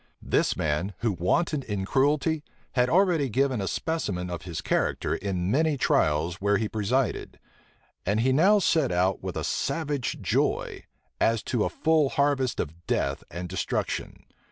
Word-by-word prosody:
This - - +1
man, 80 +6 -1
who 115 -1 +1
wantoned 140 - 0
in 100 -3 -3
cruelty, 145 - +1 0.3
had 125 -1 +2
already 170 -5 +3
given 130 -1 +1
a 95 - -2
specimen 95 - -2
of 85 -2 -4
his 85 -3 -4
character - - 0
in 95 -1 -2
many 155 +3 +2
trials 80 - +1
where 100 0 +3
he 110 - -1
presided; 110 +4 -1 0.7
and 105 +3 +1
he 130 +2 +3
now 190 +9 +5
set 165 - +2
out 90 +1 +1
with - - -5
a - - -2
savage 145 -2 -2
joy, - - -1 0.3
as 115 -1 +2
to 120 -4 0
a - - 0
full 155 -3 +2
harvest 140 -3 +1
of 85 +2 -5
death 70 0 -1
and 90 +1 -5
destruction. 90 0 -3
115 Hz, 155 wpm, -26 LUFS, 90-145 Hz, 0.7 s, now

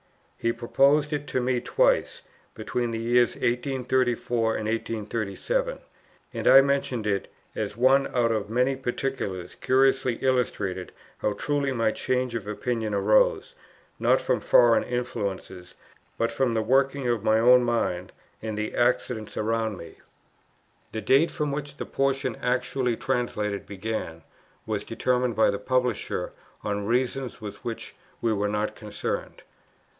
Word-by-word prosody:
He 115 - 0
proposed 140 +6 +2
it 145 0 -3
to - - -1
me 125 0 0
twice, - - +1 0.3
between 120 -1 -2
the 115 - -3
years 120 +1 +2
1834 125 -2 0
and 110 - -3
1837; 115 - -2 0.6
and - - -2
I 135 - +9
mention 135 -5 0
it 100 -2 -1 0.2
as 105 0 -4
one 135 +3 +4
out 120 -2 +1
of 105 -2 -1
many 125 +4 +2
particulars 125 -8 -3
curiously 130 -1 +2
illustrating 110 -8 -1 0.3
how 105 - 0
truly 145 +3 -1
my 115 -3 +1
change 125 +1 -1
of 110 -3 -4
opinion 110 0 -2
arose, 105 +2 +3 0.5
not - - +4
from - - 0
foreign 120 -2 +5
influences, 100 -7 -4 0.4
but 115 0 0
from 120 0 0
the 110 - +1
working 135 +2 +2
of 120 -4 0
my 110 0 +4
own 125 +2 +6
mind, 105 -7 -1 0.3
and 110 -1 -4
the 105 0 -3
accidents 120 -2 0
around 110 -1 -1
me. 85 - -11 0.9
The 110 - -4
date, 140 +8 +4
from 150 -1 -2
which 145 0 -5
the - - -4
portion 135 -3 0
actually 125 -1 0
translated 105 -4 -2
began, 100 -5 -5 0.4
was - - -2
determined 125 -1 0
by 110 - +4
the 100 - -3
Publisher 125 +1 -1 0.3
on 100 -1 -2
reasons 125 +1 -1
with 105 -2 -8
which 115 -1 -5 0.3
we 115 -1 +1
were 105 0 0
not 105 +1 -1
concerned. 105 -1 -5
120 Hz, 140 wpm, -26 LUFS, 110-130 Hz, 0.9 s, I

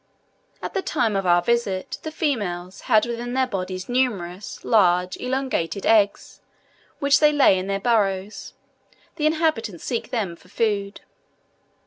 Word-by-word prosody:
At - - -4
the 390 - 0
time 240 - 0
of 195 -1 -1
our 175 0 +4
visit, 205 -4 -1
the 315 - -6
females 200 - -3
had 215 -2 +5
within 240 +1 -4
their 260 0 +3
bodies 185 -4 -4
numerous, 205 -7 -2
large, 180 -4 +3
elongated 250 -8 -2
eggs, 210 -2 +2 0.6
which 280 -1 +3
they 300 -1 +5
lay 285 -9 +5
in 185 - -5
their 195 0 -1
burrows: 200 -3 -1 0.6
the 305 - +2
inhabitants 310 - -1
seek 235 - -3
them 200 -8 -2
for 180 - -22
food. 205 -2 -1
215 Hz, 140 wpm, -23 LUFS, 185-250 Hz, 0.6 s, had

